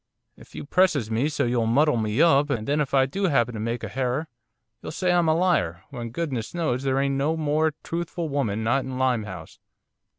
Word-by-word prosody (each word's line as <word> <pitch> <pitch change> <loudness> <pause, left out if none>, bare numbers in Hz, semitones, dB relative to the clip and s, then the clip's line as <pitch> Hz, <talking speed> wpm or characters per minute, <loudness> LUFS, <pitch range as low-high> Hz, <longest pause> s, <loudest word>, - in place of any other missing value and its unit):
'If - - -17
you - - -6
presses 155 - +2
me 120 +7 +1
so 145 - -1
you'll 120 -1 +1
muddle 145 +6 +3
of 115 - 0
me 110 +8 +2
up, 145 -3 +4
and 110 -5 -2
then 150 +1 +1
if 140 - -2
I 135 -1 +4
do 195 +9 -1
'appen 125 -6 +1
to 110 - -5
make 115 +2 -3
a - - -2
herror, 135 +4 -2 0.5
you'll - - -6
say 180 +3 0
I'm 175 -2 +3
a 160 - +3
liar, 165 - +1
when 120 -4 -6
goodness 130 -2 -4
knows 130 -8 0
there 135 -1 0
ain't 140 0 +1
no 145 +4 0
more 155 0 +1
truthful 170 0 -3
woman 115 -7 -1
not 125 +4 +1
in 130 -1 -5
Limehouse. 110 -10 -2
135 Hz, 220 wpm, -25 LUFS, 120-155 Hz, 0.5 s, up